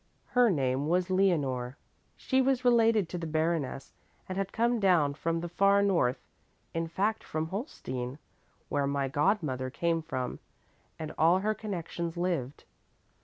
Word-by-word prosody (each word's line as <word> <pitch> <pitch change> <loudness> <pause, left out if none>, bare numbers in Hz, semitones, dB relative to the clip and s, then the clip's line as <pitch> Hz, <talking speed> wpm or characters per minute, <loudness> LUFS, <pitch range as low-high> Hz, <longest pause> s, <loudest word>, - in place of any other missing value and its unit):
"Her 245 -2 +4
name 135 -4 0
was 180 +2 +1
Leonore. 140 -9 +1 0.4
She 265 0 +1
was 260 -1 +1
related 225 -5 +4
to 180 - -4
the 165 - -4
baroness 155 -4 -1 0.3
and 185 - -4
had 195 0 -2
come 235 +1 +1
down 175 -8 +3
from 165 +3 -2
the 175 - -3
far 200 +3 +3
north, 170 -11 +2 0.5
in 165 0 -1
fact 200 +6 -1
from 155 +1 -3
Holstein, 135 - -5 0.5
where 140 -1 0
my 140 -1 0
godmother 145 - 0
came 165 +4 0
from 130 -6 -4 0.6
and 155 -1 -6
all 165 +3 +5
her 215 +2 +1
connections 170 -5 -5
lived. 170 -7 -2
170 Hz, 145 wpm, -30 LUFS, 145-195 Hz, 0.6 s, all